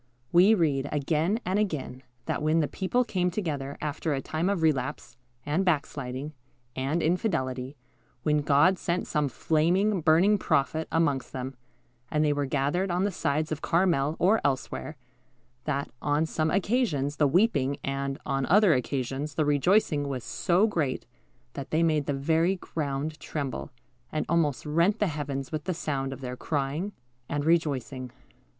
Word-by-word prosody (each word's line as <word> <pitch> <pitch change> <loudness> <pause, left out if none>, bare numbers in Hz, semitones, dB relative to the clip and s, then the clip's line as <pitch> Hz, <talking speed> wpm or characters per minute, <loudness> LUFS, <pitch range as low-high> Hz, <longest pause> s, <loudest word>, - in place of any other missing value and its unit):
We 190 +6 +6
read, 145 -6 +1
again 155 +8 +1
and 190 +3 +1
again, 150 -10 -2 0.2
that - - -2
when 155 +2 +2
the 150 - +2
people 210 - 0
came 185 -6 0
together 150 -8 -3
after 150 0 -1
a - - -1
time 160 +6 -1
of 195 -5 0
relapse, 135 -4 0 0.3
and 150 +6 +1
backsliding, 140 -4 -2 0.4
and 140 +6 -1
infidelity, 145 - -1 0.5
when 150 -1 +2
God 150 +6 +4
sent 175 +1 -1
some 150 -3 0
flaming, 175 - +1
burning 175 +6 +4
prophet 155 0 +1
amongst 145 -5 0
them, 130 +1 -4 0.6
and 155 0 +1
they 150 - +3
were 145 -1 -1
gathered 145 +8 0
on 180 +2 +1
the 205 - +1
sides 155 -2 -1
of 155 0 -3
Carmel 165 -4 +2
or 210 +5 +3
elsewhere, 140 +3 -2 0.7
that, 140 -2 -2
on 145 +2 +1
some 160 0 0
occasions, 180 - 0
the 150 - +4
weeping, 140 - +2
and, 135 0 -2
on 135 -1 -1
other 200 -1 +6
occasions, 135 +3 -2
the 155 - +1
rejoicing, 150 0 +2
was 130 -4 -4
so 185 +3 +2
great 155 -11 -1 0.5
that 140 - -6
they 160 +2 +2
made 155 -3 +1
the 145 - +1
very 160 +6 +2
ground 155 -3 -4
tremble, 140 -4 -4 0.4
and 155 - -1
almost 150 -8 +1
rent 170 +8 +2
the 210 - +2
heavens 140 -5 -3
with 155 -1 -4
the 185 - -1
sound 135 -4 -2
of 135 - -7
their 125 -1 -4
crying 145 +8 -2 0.4
and 145 0 -1
rejoicing. 140 -6 0
150 Hz, 155 wpm, -27 LUFS, 140-175 Hz, 0.7 s, We